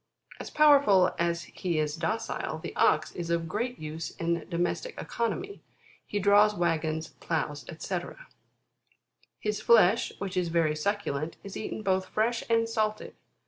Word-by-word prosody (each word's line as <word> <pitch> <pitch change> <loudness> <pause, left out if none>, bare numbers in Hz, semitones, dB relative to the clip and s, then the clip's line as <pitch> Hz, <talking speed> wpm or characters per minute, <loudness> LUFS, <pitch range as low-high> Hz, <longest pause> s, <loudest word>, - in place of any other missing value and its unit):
As - - -6
powerful 280 -12 +5
as 170 0 0
he 175 0 -3
is 150 -1 0
docile, 220 +7 -2
the - - -7
Ox - - +3
is 170 -1 -5
of 170 -1 0
great 240 +9 -2
use 155 +1 -5
in 170 0 -2
domestic 175 - -2
economy 375 - -3 0.5
He 205 - -3
draws 205 +1 +5
waggons, 160 -2 -1
ploughs, 150 -3 -2
&c. 165 - -7
10. 175 - -9 1.2
His 210 -1 -2
flesh, 225 -2 +5
which 195 -1 -5
is 180 -1 +1
very 165 -2 +1
succulent, 155 -3 -2
is 200 - -8
eaten 215 - -5
both 190 -1 +1
fresh 230 +2 0
and 230 0 +3
salted. 215 -2 -2
185 Hz, 145 wpm, -28 LUFS, 165-215 Hz, 1.2 s, powerful